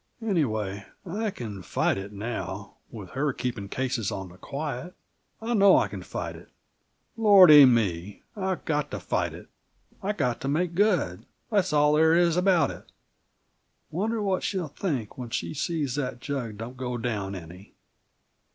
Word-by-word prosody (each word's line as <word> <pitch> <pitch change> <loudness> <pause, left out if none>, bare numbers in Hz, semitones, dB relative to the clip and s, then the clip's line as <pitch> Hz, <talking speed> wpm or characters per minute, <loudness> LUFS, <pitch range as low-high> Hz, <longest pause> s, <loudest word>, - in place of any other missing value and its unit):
"Anyway, 110 - -1 0.2
I 210 +5 -2
can 110 - -7
fight - - 0
it 95 +1 -6
now, 105 -2 -5 0.2
with 100 -5 -9
her 140 +2 0
keeping 115 -6 -4
cases 125 -5 -1
on 95 -3 -5
the 90 - -15
quiet. 150 +4 -5 0.4
I 225 +2 -2
know 200 -3 +6
I 105 - +2
can 100 -2 -7
fight - - -5
it. - - -14 0.7
Lordy 190 -10 +9
me, 105 -6 +1
I've 190 -3 -3
got 150 -2 0
to - - -5
fight - - -1
it! - - -12 0.5
I've 205 +1 -2
got 125 -6 0
to 135 - -3
make 170 +5 0
good; 180 - +1 0.2
that's 200 -7 +2
all 150 0 +4
there 160 +1 +5
is 170 -1 +3
about 180 -1 +3
it. - - -12 1.0
Wonder 215 +6 -1
what 190 -2 0
she'll 185 -6 -2
think 135 - -3
when 125 -2 -5
she - - -3
sees 150 -3 -2
that 125 -4 -3
jug 120 -5 -4
don't 120 +4 -7
go 125 -1 -3
down 105 -5 -3
any? 90 +2 -11
135 Hz, 160 wpm, -27 LUFS, 105-180 Hz, 1.0 s, Lordy